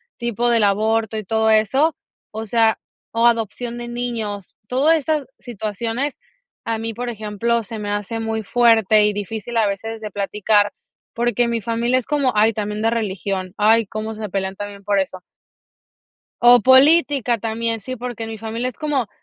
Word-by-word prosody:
tipo 235 Hz, 0 st, -1 dB
del 230 Hz, -2 st, +3 dB
aborto 220 Hz, +2 st, +1 dB
y 215 Hz, -, -5 dB
todo 220 Hz, +2 st, +1 dB
eso, 265 Hz, +9 st, +3 dB, 0.4 s
o 220 Hz, +1 st, -5 dB
sea, 225 Hz, 0 st, +2 dB, 0.3 s
o 230 Hz, +1 st, +3 dB
adopción 235 Hz, +1 st, -1 dB
de 240 Hz, 0 st, -6 dB
niños. 230 Hz, -5 st, -4 dB
Todo 270 Hz, +5 st, +3 dB
estas 310 Hz, -2 st, +1 dB
situaciones, 230 Hz, +4 st, -4 dB, 0.5 s
a 225 Hz, -1 st, -2 dB
mí, 225 Hz, 0 st, -4 dB
por 245 Hz, +2 st, -4 dB
ejemplo, 225 Hz, +1 st, -1 dB
se 220 Hz, +1 st, -7 dB
me 205 Hz, -1 st, -4 dB
hace 205 Hz, +2 st, -3 dB
muy 220 Hz, -1 st, -2 dB
fuerte 220 Hz, -3 st, +4 dB
y 210 Hz, -, +3 dB
difícil 220 Hz, +3 st, -5 dB
a 220 Hz, -2 st, +3 dB
veces 225 Hz, +3 st, -4 dB
de 215 Hz, -, -6 dB
platicar, 205 Hz, +1 st, +1 dB, 0.4 s
porque 240 Hz, 0 st, +1 dB
mi 235 Hz, -, 0 dB
familia 235 Hz, +3 st, 0 dB
es 255 Hz, -, -2 dB
como, 285 Hz, -4 st, +1 dB
ay, 215 Hz, +2 st, +3 dB
también 210 Hz, 0 st, -3 dB
de 225 Hz, -, +2 dB
religión, 195 Hz, -4 st, -3 dB
ay, 220 Hz, +2 st, +4 dB
cómo 215 Hz, +1 st, -5 dB
se 215 Hz, -1 st, -5 dB
pelean 190 Hz, 0 st, -3 dB
también 200 Hz, 0 st, -8 dB
por 205 Hz, -1 st, +2 dB
eso. 185 Hz, -1 st, -6 dB, 1.2 s
O 245 Hz, 0 st, +7 dB
política 265 Hz, -2 st, +5 dB
también, 225 Hz, +1 st, -2 dB
sí, 255 Hz, +5 st, -6 dB
porque 235 Hz, -2 st, -5 dB
mi 220 Hz, -1 st, -6 dB
familia 225 Hz, +3 st, -3 dB
es 255 Hz, -, -9 dB
como, 290 Hz, -7 st, -1 dB
225 Hz, 170 wpm, -20 LUFS, 210-240 Hz, 1.2 s, O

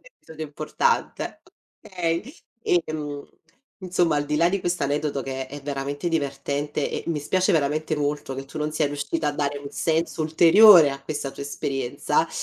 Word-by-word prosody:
episodio 160 Hz, -, -10 dB
importante 155 Hz, -, -1 dB, 0.4 s
okay! 180 Hz, -, -2 dB, 0.3 s
Ehm, 150 Hz, -4 st, -1 dB, 0.6 s
insomma, 175 Hz, -3 st, +1 dB
al 145 Hz, 0 st, -1 dB
di 150 Hz, +1 st, -1 dB
là 170 Hz, +2 st, +4 dB
di 195 Hz, 0 st, -1 dB
questo 175 Hz, -3 st, -1 dB
aneddoto, 145 Hz, -1 st, -1 dB
che 135 Hz, 0 st, -4 dB
è 140 Hz, +1 st, -9 dB
veramente 145 Hz, +3 st, -3 dB
divertente, 145 Hz, -1 st, -2 dB
e, -, -, -3 dB
mi 165 Hz, -3 st, -1 dB
spiace 185 Hz, +6 st, +1 dB
veramente 155 Hz, 0 st, +1 dB
molto, 145 Hz, -2 st, -2 dB
che 135 Hz, +1 st, -6 dB
tu 155 Hz, +3 st, -9 dB
non 150 Hz, 0 st, -1 dB
sia 155 Hz, -1 st, +1 dB
riuscita 145 Hz, +2 st, -2 dB
a 145 Hz, -, -1 dB
dare 145 Hz, -1 st, -1 dB
un 140 Hz, 0 st, -8 dB
senso 160 Hz, +5 st, -1 dB
ulteriore, 165 Hz, +1 st, +7 dB
a 135 Hz, 0 st, -7 dB
questa 145 Hz, -1 st, -4 dB
tua 140 Hz, -, -8 dB
esperienza, 135 Hz, -2 st, -1 dB
150 Hz, 165 wpm, -24 LUFS, 140-165 Hz, 0.6 s, ulteriore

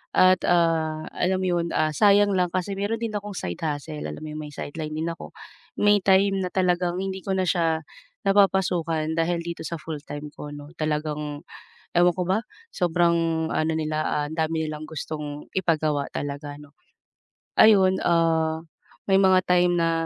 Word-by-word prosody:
At, 185 Hz, -1 st, +5 dB
ah, 160 Hz, -2 st, +2 dB
alam 185 Hz, +1 st, 0 dB
mo -, -, 0 dB
'yon, 170 Hz, -, 0 dB
ah, 155 Hz, 0 st, +2 dB
sayang 205 Hz, +4 st, +4 dB
lang 180 Hz, -1 st, +2 dB
kasi 185 Hz, +2 st, -1 dB
meron 205 Hz, +3 st, -1 dB
din 230 Hz, -2 st, -2 dB
akong 205 Hz, 0 st, -4 dB
side 90 Hz, -, -4 dB
hustle, 150 Hz, 0 st, -4 dB
alam -, -, -6 dB
mo 155 Hz, -, -6 dB
'yong 155 Hz, 0 st, -6 dB
may 150 Hz, -, -12 dB
sideline 155 Hz, +1 st, -5 dB
din 160 Hz, +2 st, -2 dB
ako. 165 Hz, -, -8 dB, 0.4 s
May 205 Hz, 0 st, +4 dB
time 195 Hz, 0 st, +4 dB
na 180 Hz, -, -2 dB
talagang 180 Hz, -1 st, +1 dB
hindi 190 Hz, 0 st, -3 dB
ko 195 Hz, -, 0 dB
na 185 Hz, -, +1 dB
siya 165 Hz, -3 st, +1 dB, 0.4 s
napapasukan 180 Hz, -5 st, +2 dB
dahil 170 Hz, +1 st, +1 dB
dito 170 Hz, 0 st, -6 dB
sa 170 Hz, -, -3 dB
full-time 150 Hz, -1 st, -7 dB
ko 150 Hz, -, -8 dB
'no, 145 Hz, 0 st, -9 dB
talagang 150 Hz, -1 st, -2 dB, 0.5 s
ewan 175 Hz, 0 st, +4 dB
ko 180 Hz, -, -2 dB
ba 190 Hz, +5 st, +1 dB, 0.3 s
sobrang 170 Hz, -2 st, +1 dB
ano 155 Hz, +1 st, +1 dB
nila, 155 Hz, -1 st, -2 dB, 0.3 s
ah, -, -, -5 dB
dami 160 Hz, 0 st, -1 dB
nilang 155 Hz, 0 st, -5 dB
gustong 150 Hz, -1 st, -6 dB
ipagawa 155 Hz, -5 st, +1 dB
talaga 145 Hz, +1 st, -4 dB
'no. 145 Hz, -1 st, -15 dB, 0.9 s
Ayun, 190 Hz, -3 st, +6 dB
ah, 160 Hz, -2 st, +2 dB, 0.5 s
may 195 Hz, -, +5 dB
mga 190 Hz, -1 st, +5 dB
time 180 Hz, 0 st, +3 dB
na 165 Hz, -1 st, +2 dB
165 Hz, 170 wpm, -25 LUFS, 155-185 Hz, 0.9 s, Ayun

